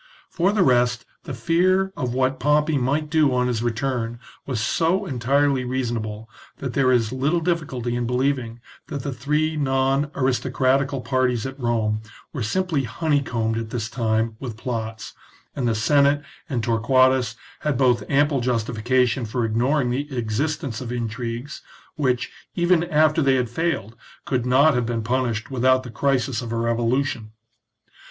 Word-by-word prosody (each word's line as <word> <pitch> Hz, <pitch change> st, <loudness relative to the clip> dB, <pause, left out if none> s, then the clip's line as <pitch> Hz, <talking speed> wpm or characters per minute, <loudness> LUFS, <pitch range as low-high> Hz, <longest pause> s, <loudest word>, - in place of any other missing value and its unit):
For 190 Hz, +2 st, +2 dB
the 205 Hz, -3 st, +3 dB
rest, 120 Hz, -3 st, +2 dB, 0.2 s
the 145 Hz, -, -5 dB
fear 185 Hz, +9 st, +2 dB
of 125 Hz, -3 st, -2 dB
what 130 Hz, +1 st, 0 dB
Pompey 150 Hz, +2 st, +2 dB
might 140 Hz, +5 st, 0 dB
do 155 Hz, -4 st, +4 dB
on 125 Hz, 0 st, +2 dB
his 120 Hz, -3 st, -1 dB
return 120 Hz, 0 st, -2 dB, 0.3 s
was 130 Hz, -5 st, -2 dB
so 170 Hz, -, +1 dB
entirely 135 Hz, 0 st, +1 dB
reasonable, 115 Hz, -4 st, -3 dB, 0.3 s
that 130 Hz, -3 st, -5 dB
there 130 Hz, -2 st, +3 dB
is 115 Hz, -3 st, +2 dB
little 140 Hz, +6 st, +1 dB
difficulty 150 Hz, -8 st, -2 dB
in 120 Hz, -1 st, -1 dB
believing 125 Hz, -2 st, -1 dB, 0.3 s
that 140 Hz, -3 st, -5 dB
the 140 Hz, -, -3 dB
three 150 Hz, +5 st, 0 dB
non 135 Hz, 0 st, +1 dB
aristocratical 130 Hz, +1 st, +1 dB
parties 125 Hz, -2 st, 0 dB
at 135 Hz, +1 st, -6 dB
Rome 110 Hz, -3 st, 0 dB, 0.3 s
were 140 Hz, -, -4 dB
simply 155 Hz, -, 0 dB
honeycombed 120 Hz, -5 st, 0 dB
at 115 Hz, -1 st, -5 dB
this 110 Hz, -2 st, -3 dB
time 115 Hz, -1 st, 0 dB
with 120 Hz, -5 st, -6 dB
plots, 110 Hz, -2 st, -5 dB, 0.4 s
and 125 Hz, -3 st, -1 dB
the 115 Hz, -, +1 dB
Senate 140 Hz, +5 st, +3 dB, 0.3 s
and 120 Hz, -4 st, -1 dB
Torquatus 125 Hz, +1 st, +3 dB, 0.2 s
had 150 Hz, -4 st, -1 dB
both 125 Hz, -2 st, +3 dB
ample 140 Hz, -1 st, +2 dB
justification 120 Hz, +1 st, +1 dB
for 115 Hz, +2 st, -1 dB
ignoring 125 Hz, +4 st, +1 dB
the 135 Hz, +1 st, -3 dB
existence 130 Hz, +3 st, -2 dB
of 120 Hz, -2 st, -5 dB
intrigues, 120 Hz, +3 st, -4 dB, 0.3 s
which, 130 Hz, -4 st, 0 dB, 0.2 s
even 175 Hz, -1 st, +3 dB
after 155 Hz, -1 st, +3 dB
they 135 Hz, -2 st, +3 dB
had 125 Hz, -3 st, -1 dB
failed, 135 Hz, -, -2 dB, 0.3 s
could 125 Hz, -2 st, -1 dB
not 140 Hz, +5 st, +5 dB
have 125 Hz, -2 st, 0 dB
been 115 Hz, -2 st, -2 dB
punished 120 Hz, -1 st, -1 dB
without 130 Hz, 0 st, +3 dB
the 125 Hz, -, -8 dB
crisis 130 Hz, -2 st, 0 dB
of 115 Hz, -2 st, -6 dB
a 115 Hz, -, -1 dB
revolution. 115 Hz, 0 st, -1 dB
130 Hz, 155 wpm, -23 LUFS, 115-140 Hz, 0.4 s, not